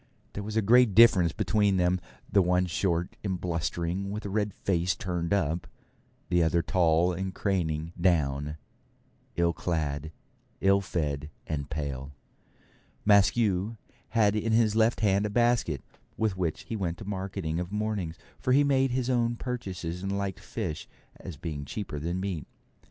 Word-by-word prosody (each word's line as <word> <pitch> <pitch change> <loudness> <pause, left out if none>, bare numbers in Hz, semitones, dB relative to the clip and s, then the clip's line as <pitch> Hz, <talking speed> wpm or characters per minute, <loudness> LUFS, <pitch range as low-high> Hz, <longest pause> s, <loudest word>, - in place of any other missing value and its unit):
There 105 - -4
was 105 +2 -4
a 110 - +3
great 120 -1 +5
difference 95 -8 +7
between 100 +1 +2
them; 90 0 +2 0.3
the 100 - +4
one 90 0 +2
short 85 0 -1
and 95 -3 -2
blustering, 85 +2 -2
with 105 +2 -5
a 100 - -4
red 105 0 0
face 90 -1 0
turned 90 -2 -3
up; 85 -4 0 0.6
the 90 - +3
other 85 +1 +2
tall 85 0 +3
and 95 +1 -4
craning 85 -5 -1
down, 75 -4 +1 0.8
ill 85 0 +2
clad, 80 -3 -2 0.5
ill 100 0 +4
fed, 75 -6 -2 0.2
and 70 -2 -3
pale. 70 -2 -4 0.9
Maskew 100 0 +3 0.3
had 110 -3 +3
in 110 +1 0
his 110 -2 +3
left 115 +1 +3
hand 100 0 +3
a - - -5
basket, 120 - +1 0.3
with 110 -4 0
which 85 -4 -2
he 115 - -5
went 95 0 -3
marketing 95 -4 -3
of 90 +1 -4
mornings, 105 -6 -2 0.2
for 130 - +1
he 145 +2 +6
made 135 -2 +3
his 125 0 -1
own 120 -2 +1
purchases, 95 -9 -4
and 100 +1 -2
liked 100 -2 -3
fish, 90 -10 -5 0.3
as 85 -6 -8
being 75 -1 -5
cheaper 75 +1 -5
than 85 +4 -2
meat. 95 -5 -3
95 Hz, 155 wpm, -28 LUFS, 85-105 Hz, 0.9 s, difference